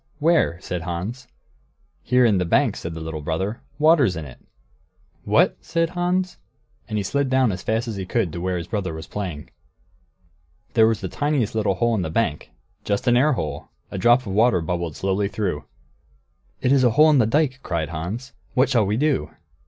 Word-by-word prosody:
Where?" 155 - +2
said 90 -1 -4
Hans. 90 +9 -5 0.7
"Here 125 0 +3
in 105 -5 +3
the - - +1
bank," 85 - +2
said 85 -1 -6
the - - -5
little 80 -1 -5
brother; 95 +9 -3 0.2
"water's 150 - +4
in 80 -2 -5
it." 65 - -12 0.9
"What!" - - +3
said 165 0 -1
Hans, 180 - -1 0.5
and 105 - -2
he 105 - 0
slid 140 +7 0
down 130 -3 +3
as 95 0 -5
fast 110 +2 -1
as 110 -3 -4
he 95 - -4
could 95 -9 0
to 85 - -5
where 90 0 -1
his 85 - -4
brother 95 -4 -3
was 80 - -7
playing. 90 -8 -6 1.2
There 110 -1 +5
was 115 -1 0
the - - -3
tiniest 145 -7 -1
little 105 -3 +1
hole 120 +3 +1
in 105 - 0
the 80 - -2
bank. 80 -4 -1 0.3
Just 100 -1 -1
an 120 - +4
air 145 +5 +4
hole. 75 - -4 0.2
A - - -4
drop 120 +2 +5
of 100 -6 -6
water 110 -2 +4
bubbled 85 -1 -3
slowly 95 +1 0
through. 90 -9 -3 1.0
"It 125 - +2
is 135 -2 +4
a 125 - +5
hole 155 +7 +5
in 145 - +4
the 110 - +3
dike!" 135 +1 +1
cried 85 - -2
Hans. 95 - -5 0.2
"What 130 +1 +3
shall 115 -6 +2
we 105 +2 0
do?" 130 - +1
105 Hz, 200 wpm, -23 LUFS, 90-130 Hz, 1.2 s, There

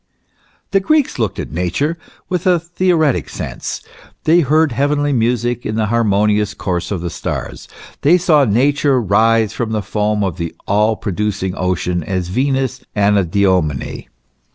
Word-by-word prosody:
The 195 - +4
Greeks 290 - +1
looked 110 -3 -1
at - - -5
Nature 90 - -1 0.3
with 180 -1 -2
the 180 -2 +4
theoretic 170 -4 +1
sense; - - -5 0.4
they 165 +3 +4
heard 155 0 +3
heavenly 145 +3 +1
music 120 0 0
in 105 - -3
the 110 -1 +1
harmonious 105 -2 +2
course 90 -2 -3
of 95 -5 -3
the 85 -1 -4
stars; - - -5 0.3
they 170 +5 +5
saw 160 -5 +4
Nature 135 +4 +2
rise 110 +1 +2
from 115 -2 -3
the 105 -2 -1
foam 105 +1 0
of 95 -2 -2
the 85 -2 -4
all 105 +2 +2
producing 100 -2 -2
ocean 90 -2 -1
as 90 0 -3
Venus 130 +4 0
Anadyomene. 95 - +1
110 Hz, 145 wpm, -17 LUFS, 100-145 Hz, 0.4 s, they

